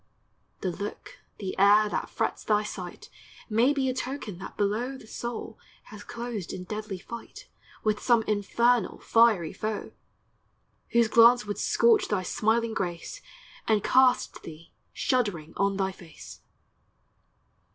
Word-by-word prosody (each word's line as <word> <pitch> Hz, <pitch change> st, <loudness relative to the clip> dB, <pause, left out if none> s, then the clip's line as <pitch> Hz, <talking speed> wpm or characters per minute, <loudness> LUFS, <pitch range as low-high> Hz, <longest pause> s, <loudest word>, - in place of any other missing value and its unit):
The 185 Hz, -, -1 dB
look, 200 Hz, +4 st, -7 dB, 0.2 s
the 195 Hz, -3 st, -5 dB
air, 205 Hz, +2 st, +6 dB
that -, -, -3 dB
frets -, -, -2 dB
thy 210 Hz, -1 st, +2 dB
sight 185 Hz, -4 st, -8 dB, 0.4 s
May 235 Hz, +6 st, +4 dB
be 275 Hz, -2 st, 0 dB
a 255 Hz, -, 0 dB
token 250 Hz, -7 st, -5 dB
that -, -, -9 dB
below 225 Hz, +6 st, -1 dB
The 245 Hz, -, -14 dB
soul 230 Hz, 0 st, -6 dB, 0.2 s
has 210 Hz, -1 st, -12 dB
closed 235 Hz, -6 st, -5 dB
in 185 Hz, -, -6 dB
deadly 210 Hz, 0 st, -5 dB
fight 235 Hz, -, -10 dB, 0.4 s
With 215 Hz, -1 st, 0 dB
some 235 Hz, -3 st, +3 dB
infernal 215 Hz, +2 st, +1 dB
fiery 220 Hz, -8 st, +3 dB
foe, 215 Hz, -1 st, -4 dB, 1.0 s
Whose 235 Hz, -1 st, +4 dB
glance 235 Hz, +1 st, +6 dB
would 205 Hz, 0 st, -4 dB
scorch 455 Hz, -3 st, +3 dB
thy 195 Hz, -3 st, -1 dB
smiling 225 Hz, +4 st, 0 dB
grace 180 Hz, -, -4 dB, 0.5 s
And 215 Hz, -2 st, +2 dB
cast 255 Hz, -1 st, +3 dB
thee 165 Hz, +1 st, -12 dB, 0.2 s
shuddering 205 Hz, -12 st, -1 dB
on 200 Hz, 0 st, +1 dB
thy 190 Hz, -1 st, 0 dB
face! 175 Hz, -3 st, -13 dB
215 Hz, 135 wpm, -27 LUFS, 195-235 Hz, 1.0 s, air